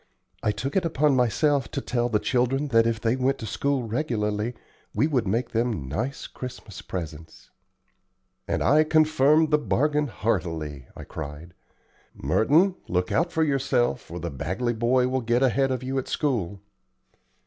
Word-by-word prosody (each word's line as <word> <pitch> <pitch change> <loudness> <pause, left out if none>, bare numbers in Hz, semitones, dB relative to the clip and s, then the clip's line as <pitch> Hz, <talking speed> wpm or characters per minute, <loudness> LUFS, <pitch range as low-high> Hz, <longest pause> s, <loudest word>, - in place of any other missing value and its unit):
I 105 - +1
took 135 +6 -4
it 190 - +3
upon 150 -3 +2
myself 130 +2 +2
to - - -3
tell 120 -1 -1
the 110 - +2
children 130 +5 0
that 115 -2 +4
if 115 -2 -1
they 115 +2 +1
went 130 +1 +1
to - - -7
school 140 +4 -1
regularly 110 -2 -2 0.4
we - - +3
would 130 -9 0
make 115 +6 -1
them 115 - -1
nice 115 - -3
Christmas 120 -6 -8
presents." 80 -4 -8 1.0
"And - - 0
I 150 +4 +5
confirm 155 0 +4
the 150 - +4
bargain 150 +1 +1
heartily," 80 - -3
I - - -8
cried. 80 +3 -8 0.6
"Merton, 175 - +3
look 90 0 -1
out 170 +1 +1
for 160 -1 +1
yourself, 135 -4 0
or 85 +1 -6
the 85 0 -4
Bagley 95 - -2
boy 125 +3 +2
will 130 0 0
get 120 +2 +1
ahead 135 +1 +2
of 130 -1 -2
you 135 +1 -1
at 130 - -6
school." 100 - -1
125 Hz, 160 wpm, -25 LUFS, 105-140 Hz, 1.0 s, I